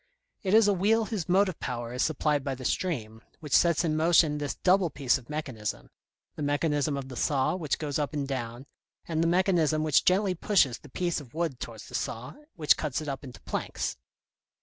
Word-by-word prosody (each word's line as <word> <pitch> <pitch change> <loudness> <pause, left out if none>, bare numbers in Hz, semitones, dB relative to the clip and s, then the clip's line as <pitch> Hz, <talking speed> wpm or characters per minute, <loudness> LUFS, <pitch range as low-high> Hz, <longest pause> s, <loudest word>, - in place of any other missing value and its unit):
It 195 0 +2
is 220 -1 +6
a 205 - +4
wheel 215 +4 +2
whose 200 -7 -4
motive 190 0 +2
power 120 -1 -4
is 125 - -2
supplied 150 -2 +1
by 135 -1 -2
the 130 0 -9
stream, 115 -13 -2 0.2
which 150 -5 0
sets 170 -1 +4
in 155 -2 0
motion 160 -2 +4
this 145 -1 -3
double 185 -1 +3
piece 135 -3 +1
of 125 - -19
mechanism, 130 -9 -5 0.4
the - - -7
mechanism 145 0 0
of 135 -1 -5
the 130 - -8
saw 135 +4 +1
which 160 -6 -1
goes 150 -1 -2
up 145 -2 -1
and 145 -3 -2
down, 120 -1 -4 0.4
and 160 -1 0
the 165 - +2
mechanism 170 -4 +2
which 155 -3 +3
gently 190 +1 +3
pushes 160 - +2
the 150 - -15
piece 175 +2 -1
of 135 0 -15
wood 160 -6 -2
towards 115 -2 -8
the - - -14
saw, 115 +3 -4 0.2
which 150 -3 +4
cuts 150 -3 -2
it 155 - -6
up 140 0 -4
into 130 -3 -11
planks. - - -3
150 Hz, 205 wpm, -28 LUFS, 135-175 Hz, 0.4 s, is